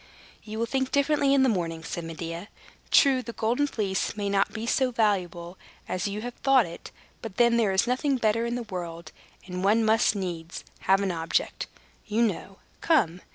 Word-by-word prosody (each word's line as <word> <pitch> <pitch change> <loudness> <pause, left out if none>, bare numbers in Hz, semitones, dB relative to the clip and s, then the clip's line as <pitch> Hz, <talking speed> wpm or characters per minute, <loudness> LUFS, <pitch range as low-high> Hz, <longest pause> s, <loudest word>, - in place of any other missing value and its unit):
"You 215 0 -7
will 230 - 0
think 265 +2 -1
differently 280 0 +2
in 275 -1 +5
the - - +4
morning," 165 -7 -1
said 170 +1 -5
Medea. 165 +3 -6 0.4
"True, 270 -3 +5
the 235 -2 -8
Golden 240 +7 +1
Fleece 205 -4 -2
may 200 -1 -1
not 200 0 +2
be 225 0 -5
so 260 +2 +2
valuable 185 -6 -1 0.3
as 185 - -2
you 205 +1 -4
have 245 +1 -5
thought 270 -4 +5
it; 170 - -9 0.3
but 220 -5 -8
then 235 -1 +5
there 225 -4 +2
is 190 +4 +2
nothing 260 +3 +1
better 230 0 +1
in 235 - -2
the 245 - -3
world; 170 -5 -7 0.3
and 180 0 -5
one 220 +3 +3
must 220 -1 +3
needs 175 -4 -5 0.3
have 195 +1 +5
an 195 -2 0
object, 165 -1 -1 0.4
you 220 +2 +2
know. 195 -2 -2 0.2
Come! 180 - +2
210 Hz, 190 wpm, -27 LUFS, 180-240 Hz, 0.4 s, in